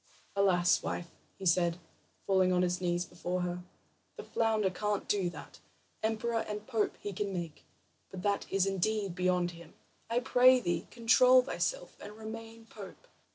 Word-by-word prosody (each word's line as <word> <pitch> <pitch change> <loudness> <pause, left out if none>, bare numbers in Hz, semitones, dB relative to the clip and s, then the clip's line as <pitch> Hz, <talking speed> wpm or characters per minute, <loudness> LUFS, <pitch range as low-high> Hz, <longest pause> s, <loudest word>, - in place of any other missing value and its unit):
"Alas, 180 -3 +3
wife," 170 -1 -4 0.3
he 195 - -8
said, 170 -1 +3 0.5
falling 190 -1 +3
on 180 0 +3
his 180 0 -1
knees 175 0 0
before 180 +1 -3
her, 180 0 -2 0.6
"the - - -8
flounder 220 -4 +1
can't 210 +2 -2
do 195 -4 +1
that. - - -11 0.4
Emperor 225 +1 0
and 210 0 -5
pope 225 -4 -1
he 205 - -5
can 200 +1 -2
make, 170 -4 -5 0.5
but 185 -1 -8
that 200 -1 -1
is 195 -1 +2
indeed 195 0 -1
beyond 180 -1 +1
him. 170 -2 -14 0.3
I 235 +1 +2
pray 255 0 +5
thee, 175 -7 -2
control 250 +2 +5
thyself - - -3
and 205 - -9
remain 225 +1 -9
pope." 210 - -11
195 Hz, 155 wpm, -31 LUFS, 180-225 Hz, 0.6 s, pray